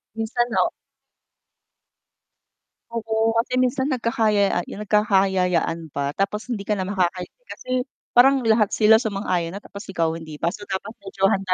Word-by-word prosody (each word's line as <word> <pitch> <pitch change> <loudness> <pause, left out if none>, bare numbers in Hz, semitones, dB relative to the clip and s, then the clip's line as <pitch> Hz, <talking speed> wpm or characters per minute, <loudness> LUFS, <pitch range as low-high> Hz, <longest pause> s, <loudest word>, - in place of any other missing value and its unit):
Minsan 235 +2 -1
ho. - - +3 2.2
Oo, 225 0 0
kasi 250 +2 +1
minsan 260 +3 +1
nagkakaya 220 -7 +1
nagkakayayaan 190 -6 +1
pa 140 +1 -3
tapos 210 +3 -2
hindi 230 -5 -3
ka 205 - -4
na 185 - -2
makakahindi 185 - -2
kasi - - -10 0.5
parang 270 +3 +6
lahat 220 -2 +3
sila 220 0 +5
sumang-ayon 195 -6 -1
na, 200 - -5
tapos 200 0 -10
ikaw 165 -4 0
hindi 155 -2 -10
pa. - - +2
So, 205 +3 -8
dapat 190 +2 -4
medyo 195 0 0
handa 190 -1 0
205 Hz, 140 wpm, -23 LUFS, 185-225 Hz, 2.2 s, parang